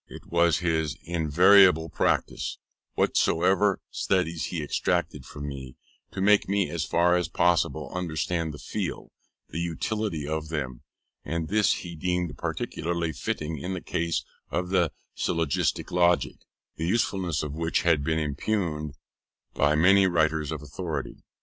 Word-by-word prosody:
It - - -11
was 85 -2 +4
his 80 -3 0
invariable 85 +1 +5
practice, - - -1 0.4
whatever 95 +4 +2
studies 80 +1 0
he 85 -4 -3
exacted 75 - -1
from 70 0 -7
me, 65 -2 -7 0.3
to 95 - -5
make 100 0 +4
me 100 -1 +1
as 85 -3 -2
far 90 +1 +3
as 90 -1 +1
possible 80 -4 +1
understand 85 -1 -2
and - - -11
feel - - -4 0.4
the 85 - -4
utility 85 -1 -2
of 80 0 -3
them: 65 -6 -4 0.4
and 80 -1 -3
this 105 -1 +3
he 85 -2 -6
deemed 90 +1 -1
peculiarly 85 -1 -3
fitting 75 +3 -3
in 95 +6 -3
the - - -3
case 85 0 -2 0.2
of 90 0 -2
the 90 -4 +2 0.2
syllogistic 80 -4 -1
logic, 90 0 +2 0.4
the 80 - -2
usefulness 95 -6 0
of 75 -2 -4
which 80 +1 0
had 80 -4 +3
been 80 +1 0
impugned 75 -1 -2 0.6
by 75 +1 +3
so 75 - +2
many 95 +2 +6
writers 80 -3 +1
of 75 -2 -5
authority. 80 +3 -5
85 Hz, 145 wpm, -27 LUFS, 75-90 Hz, 0.6 s, many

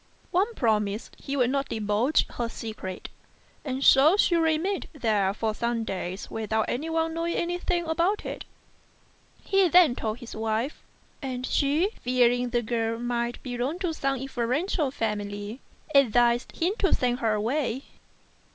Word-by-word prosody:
Wang 385 +6 +2
promised 210 -2 0
he 280 +1 -4
would 250 -1 +3
not 275 0 -1
divulge 220 +6 +1
her 235 -1 -4
secret, 215 -6 -6 0.5
and 265 -1 -3
so 295 +9 +6
she 355 - +3
remained 330 +4 +1
there 215 -8 +1
for 215 +2 -2
some 235 +1 -1
days 185 -2 -5
without 220 0 -1
anyone 325 +4 -1
knowing 335 +1 -1
anything 350 0 -1
about 340 +6 0
it. - - -5 1.0
He 390 -1 +3
then 345 -5 +6
told 220 -2 -3
his 240 -2 -9
wife, 220 +5 -2 0.4
and 255 -2 -4
she, 300 +11 +1
fearing 245 0 +3
the 240 0 0
girl 230 0 -1
might 240 0 -2
belong 250 +5 -2
to 360 -3 -2
some 275 -3 -1
influential 270 - -1
family, 210 -2 -3 0.3
advised 240 -2 +3
him 350 +4 +1
to 385 - +3
send 245 0 0
her 220 -3 +1
away. 255 +4 -1
245 Hz, 140 wpm, -27 LUFS, 225-315 Hz, 1.0 s, so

